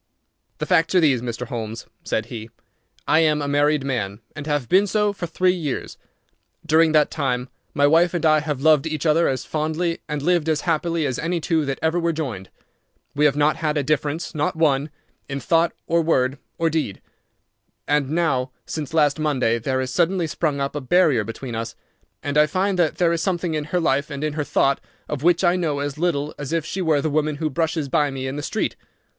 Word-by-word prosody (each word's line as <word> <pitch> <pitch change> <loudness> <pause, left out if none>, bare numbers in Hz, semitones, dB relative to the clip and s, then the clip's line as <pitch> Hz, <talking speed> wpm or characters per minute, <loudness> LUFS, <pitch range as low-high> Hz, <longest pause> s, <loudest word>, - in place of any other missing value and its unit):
"The - - -3
facts 180 0 +2
are - - +7
these, 140 -7 +3
Mr. 120 0 -4
Holmes," 115 -2 -5 0.2
said 110 - -1
he. 115 -2 -8 0.6
"I 155 - +4
am 155 -2 +3
a 145 - -2
married 145 0 +2
man, 105 -7 -2 0.2
and 145 +1 -7
have 145 -5 -1
been 195 - +4
so 210 +1 +1
for 180 -3 -5
three 180 +2 +2
years. 155 -8 -4 0.7
During 160 0 +4
that 150 -1 +4
time 130 -4 -1 0.3
my 145 -1 +4
wife 165 +4 +4
and 170 - -1
I 155 -1 +5
have 150 -3 -3
loved 155 -1 +4
each 155 0 -3
other 165 +2 +4
as 130 -1 -2
fondly 160 +2 -1
and 150 -1 -3
lived 170 -1 +2
as 155 -2 +1
happily 165 -1 0
as 130 -3 -2
any 170 +2 -1
two 160 -1 0
that 135 -1 -2
ever 160 +2 +2
were 170 -1 0
joined. 125 - -5 0.6
We 150 +1 +2
have 145 -2 +4
not 150 +1 +2
had 155 -1 -1
a 145 - +1
difference, 150 +3 -1
not 150 0 -1
one, 150 -2 +2 0.4
in 140 0 -3
thought 165 +6 +2
or 170 0 +2
word 135 -4 +1 0.2
or 165 - +1
deed. 150 -11 -2 0.9
And 145 -2 +1
now, 145 -6 +1 0.2
since 155 0 -5
last 150 -1 +3
Monday, 130 -7 +1
there 130 +3 -1
has 130 0 -3
suddenly 175 +3 +1
sprung 150 -2 -1
up 140 +1 -2
a 145 - -2
barrier 135 -4 +3
between 115 +3 -7
us, 115 0 -4 0.5
and 145 +1 +1
I 150 - +5
find 185 +3 0
that 160 -4 +2
there 170 -2 +3
is 165 - -1
something 175 -2 -1
in 150 -1 -2
her 180 +4 -1
life 140 -2 +1
and 140 -1 -5
in 155 -1 -1
her 150 0 -1
thought 140 -1 +1 0.3
of 150 -3 -4
which 175 +3 +3
I 175 0 +4
know 165 -5 -1
as 145 +1 -3
little 150 -4 0
as 145 -1 -5
if 165 -2 0
she 190 - -3
were 155 -5 +2
the 155 - 0
woman 155 0 0
who 155 +1 -2
brushes 160 0 -1
by 145 +2 +2
me 135 -1 -5
in 130 +1 -3
the 145 - -3
street. - - -2
150 Hz, 215 wpm, -22 LUFS, 140-165 Hz, 0.9 s, are